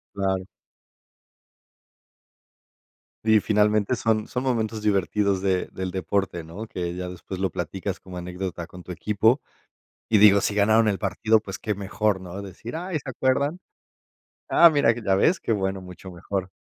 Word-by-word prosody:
Claro. 95 -1 -1 2.8
Sí, 110 -1 +6
finalmente 105 +2 +2
son 110 -2 0
son 125 - -3
momentos 110 -4 -1
divertidos 100 -1 +1
de 95 -2 0
del 95 -1 -4
deporte, 95 -1 -2
¿no?, 90 +8 -8
que 85 -4 -4
ya 90 0 -5
después 90 +1 -7
lo 95 -1 0
platicas 95 +3 -4
como 90 -1 -9
anécdota 90 -1 -5
con 90 0 -12
tu 90 - -8
equipo, 105 - +2 0.7
y 110 - +4
digo, 100 -1 +7
si 105 - -1
ganaron 110 +2 +4
el 100 -2 0
partido, 110 +2 +2
pues, 95 -3 -7
qué 105 -2 -2
mejor, 100 0 -1
¿no?, 90 +2 -7
decir: 100 - -8
"Ay, 175 -1 -3
¿se 135 -1 -7
acuerdan?". 140 +6 0 0.9
Ah, 170 - +8
mira, 145 -7 +3
ya 110 -5 0
ves, 160 - +3
qué - - -1
bueno, 95 -2 -1
mucho 90 0 -10
mejor. 95 +2 -4
100 Hz, 155 wpm, -25 LUFS, 95-110 Hz, 2.8 s, Ah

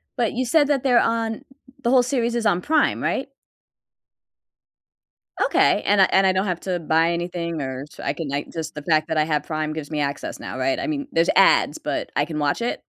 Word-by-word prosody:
But 235 -3 0
you 255 +2 -1
said 290 +3 +3
that 275 -3 0
they're 250 -3 +4
on 225 -1 -1 0.4
the 235 - 0
whole 255 -1 +5
series 240 -2 -1
is 235 - -1
on 180 -4 +2
Prime, 310 +5 +1
right? - - -2 2.2
Okay, - - +3
and 205 0 +4
I - - +8
and 195 0 +4
I 190 - +3
don't 190 +1 0
have 180 -2 -2
to 180 -2 -2
buy 165 +1 +2
anything 170 -2 -3
or 130 0 -5
sh - - -18
I 140 - -1
can 160 +1 -5
like, 140 +1 -3
just 160 -2 -6
the 150 - -6
fact 155 0 +2
that 160 -1 -2
I 155 - +4
have 150 -1 -1
Prime 155 -1 -3
gives 155 -2 -6
me 155 -2 -3
access 140 0 -4
now, - - -7
right? 130 +1 0
I - - -3
mean, 285 -2 -3
there's 165 +1 +2
ads, - - +4
but - - -4
I 145 - +2
can 155 -1 -5
watch 145 +7 0
it? 235 - -2
170 Hz, 225 wpm, -22 LUFS, 155-235 Hz, 2.2 s, I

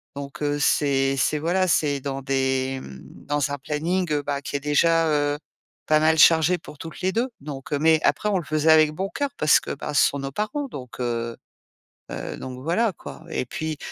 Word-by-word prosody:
Donc, 140 +1 -8
heu, 145 0 0
c'est 135 -1 +2
c'est 150 - +1
voilà, 185 +4 +1
c'est 145 -4 +1
dans 135 0 -4
des, 130 0 0
mmh, 65 -1 -10 0.3
dans 145 -1 0
un 145 - -2
planning, 165 +5 -1
heu, 145 -1 0
bah, 140 0 -2
qui 140 - -6
est - - -6
déjà, 165 +3 +3
heu, 145 -1 +1 0.5
pas 155 0 +4
mal 160 +1 +3
chargé 165 +3 +6
pour 150 -2 -13
toutes 165 -1 -8
les 185 +1 +1
2. 240 +4 0
Donc, 140 -2 -8
heu, 140 - +1
mais 160 0 +4
après, 210 - +1
on 195 -3 +1
le - - -6
faisait 155 +1 +2
avec 155 -1 +6
bon 190 +4 -3
cœur 285 -1 -1
parce 150 -1 +5
que, - - -6
bah, 150 +1 -6
ce - - +5
sont 140 - -5
nos 135 0 -4
parents 215 - -3
donc, 125 - -9
heu, 115 -1 -2 0.8
heu, - - -5
donc 130 -1 -7
voilà, 190 +7 +1
quoi. 160 - -11
Et 130 - -2
puis, 155 +2 -4
150 Hz, 215 wpm, -24 LUFS, 135-165 Hz, 0.8 s, chargé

